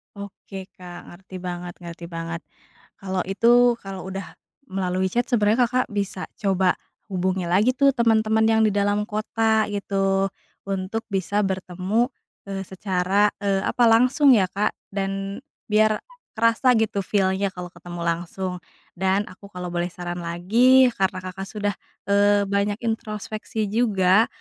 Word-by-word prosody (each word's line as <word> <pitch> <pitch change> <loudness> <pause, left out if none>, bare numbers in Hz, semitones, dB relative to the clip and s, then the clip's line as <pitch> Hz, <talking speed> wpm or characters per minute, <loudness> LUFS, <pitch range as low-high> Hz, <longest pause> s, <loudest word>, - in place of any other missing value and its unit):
Oke, 195 -1 -9
Kak, 180 -3 -11
ngerti 185 +1 -13
banget 175 -1 -5
ngerti 170 0 -8
banget. 165 0 -5 0.6
Kalau 190 -1 -3
itu 240 +5 +4
kalau 190 -1 -7
udah 190 0 -6 0.4
melalui 185 0 -1
chat 240 +1 0
sebenarnya 230 0 +3
Kakak 250 -1 -1
bisa 200 -2 -3 0.2
coba 190 -4 +2 0.4
hubungi 185 0 0
lagi 205 +9 +3
tuh 275 +1 +5
teman-teman 220 -2 +3
yang 220 0 +3
di 215 - +3
dalam 205 +1 +1
kota 220 +1 +1
gitu 195 -1 0 0.3
untuk 195 +3 -3
bisa 200 +2 0
bertemu, 190 +4 0 0.4
eee, 195 -1 -4
secara, 190 +1 +1 0.2
eee, 195 -1 +2
apa 245 - +1
langsung 255 +4 +5
ya, 195 -6 +5
Kak, 200 +3 0 0.2
dan 195 +4 -3 0.2
biar 215 0 +3 0.4
kerasa 230 +3 +3
gitu 220 -3 +1
feel-nya 190 0 +1
kalau 180 -1 -8
ketemu 175 -2 -8
langsung. 175 +2 -3 0.3
Dan 190 +2 +1
aku 200 +2 -13
kalau 180 -2 -6
boleh 175 0 -1
saran 175 0 -6
lagi 235 +10 +4
karena 190 -3 -1
Kakak 190 +1 -6
sudah, 205 -1 -2 0.4
eee, 205 0 +4
banyak 200 +1 0
introspeksi 215 -1 -3
juga, 210 -2 +3
195 Hz, 140 wpm, -23 LUFS, 185-220 Hz, 0.6 s, tuh